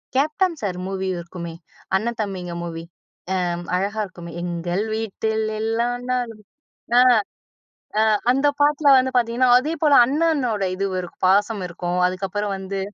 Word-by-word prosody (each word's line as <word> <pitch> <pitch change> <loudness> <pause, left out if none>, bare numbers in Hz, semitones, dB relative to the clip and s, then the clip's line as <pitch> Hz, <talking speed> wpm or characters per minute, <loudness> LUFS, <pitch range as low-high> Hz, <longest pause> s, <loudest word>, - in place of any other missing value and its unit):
Captain 310 +5 +1
sir 190 -4 -2
movie 190 0 -3
இருக்குமே, 170 -1 -7 0.4
அண்ணன் 230 +4 -1
தம்பிங்க 185 -4 -4
மூவி. 165 -1 -6 0.6
எ - - 0 0.3
அழகா 200 +4 -1
இருக்குமே 175 -3 -10
"எங்கள் 175 +2 -2
வீட்டில் 220 0 -2 0.2
எல்லா 225 +2 0 0.2
நாலும்" 240 -4 -2 0.6
அ - - +8
அ 235 - +5 1.2
அந்த 270 +3 +1
பாட்ல 290 -1 +4
வந்து 260 0 +3
பாத்திங்கன்னா, 240 +1 +2
அதேபோல 300 +2 +1
அண்ணனோட 280 -7 +1
இது 195 +1 -2
இருக் 190 -1 -3
ஒரு 180 - -6 0.2
பாசம் 205 +2 +3
இருக்கும். 175 +1 -3
அதுக்கப்பறம் 195 +2 -2
வந்து, 190 0 -4
210 Hz, 135 wpm, -22 LUFS, 185-255 Hz, 1.2 s, அ